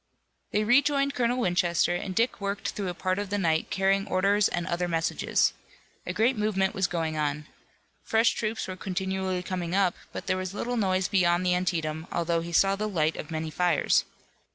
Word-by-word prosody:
They 210 Hz, -, +1 dB
rejoined 280 Hz, +4 st, +3 dB
Colonel 245 Hz, -1 st, +1 dB
Winchester, 175 Hz, -5 st, +2 dB
and 185 Hz, +1 st, -4 dB
Dick 230 Hz, 0 st, +1 dB
worked 200 Hz, 0 st, -2 dB
through 200 Hz, -2 st, -4 dB
a 175 Hz, -, -5 dB
part 185 Hz, +2 st, -1 dB
of 205 Hz, -1 st, -4 dB
the 205 Hz, -, -1 dB
night 160 Hz, -5 st, +1 dB
carrying 195 Hz, +1 st, +1 dB
orders 200 Hz, +2 st, +3 dB
and 175 Hz, -1 st, -2 dB
other 175 Hz, 0 st, -1 dB
messages. 165 Hz, -1 st, +1 dB, 0.5 s
A -, -, -1 dB
great 235 Hz, +4 st, +2 dB
movement 205 Hz, -3 st, 0 dB
was 190 Hz, -2 st, +1 dB
going 160 Hz, -3 st, -2 dB
on. 150 Hz, 0 st, -1 dB, 0.6 s
Fresh 225 Hz, +1 st, +3 dB
troops 220 Hz, 0 st, -3 dB
were 185 Hz, -, -5 dB
continually 190 Hz, -1 st, -2 dB
coming 180 Hz, -1 st, -3 dB
up, 190 Hz, -3 st, +3 dB, 0.2 s
but -, -, -6 dB
there 185 Hz, -, 0 dB
was 185 Hz, +1 st, -4 dB
little 245 Hz, +3 st, -2 dB
noise 190 Hz, -4 st, +1 dB
beyond 180 Hz, -2 st, +2 dB
the 180 Hz, -, +3 dB
Antietam, 165 Hz, -3 st, -1 dB
although 170 Hz, -1 st, 0 dB
he 170 Hz, +1 st, -6 dB
saw 195 Hz, +3 st, +4 dB
the 215 Hz, +2 st, -2 dB
light 160 Hz, -5 st, +1 dB
of 150 Hz, -, -7 dB
many 160 Hz, -1 st, -3 dB
fires. 175 Hz, -2 st, +2 dB
185 Hz, 190 wpm, -27 LUFS, 170-205 Hz, 0.6 s, saw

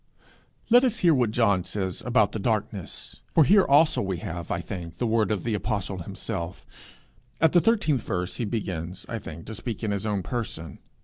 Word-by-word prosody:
Let 245 Hz, +2 st, +8 dB
us 245 Hz, -3 st, +2 dB
hear 170 Hz, -, +7 dB
what 125 Hz, -5 st, +2 dB
John 100 Hz, -5 st, +2 dB
says 95 Hz, 0 st, -3 dB
about 110 Hz, -5 st, +3 dB
the 110 Hz, -, -4 dB
darkness. 105 Hz, -4 st, -3 dB, 0.2 s
For 160 Hz, -, +7 dB
here 195 Hz, +6 st, +6 dB
also 150 Hz, +3 st, +4 dB
we 95 Hz, -2 st, -2 dB
have, 85 Hz, +1 st, -6 dB
I -, -, -1 dB
think, 85 Hz, -3 st, -7 dB
the 120 Hz, -, -1 dB
word 110 Hz, -3 st, +2 dB
of 105 Hz, -4 st, -1 dB
the 115 Hz, -, -1 dB
apostle 100 Hz, -3 st, -2 dB
himself: 85 Hz, 0 st, -5 dB, 0.7 s
at 160 Hz, -, +5 dB
the 175 Hz, -, +5 dB
13th 200 Hz, -, +2 dB
verse 90 Hz, -2 st, -3 dB
he 120 Hz, -, -1 dB
begins, 95 Hz, -4 st, -4 dB
I 115 Hz, -, -4 dB
think, 80 Hz, -4 st, -9 dB
to 110 Hz, -, -7 dB
speak 115 Hz, 0 st, -5 dB
in 105 Hz, -, 0 dB
his 100 Hz, +1 st, -2 dB
own 100 Hz, -3 st, -1 dB
person. 85 Hz, -, -5 dB
105 Hz, 195 wpm, -26 LUFS, 95-120 Hz, 0.7 s, Let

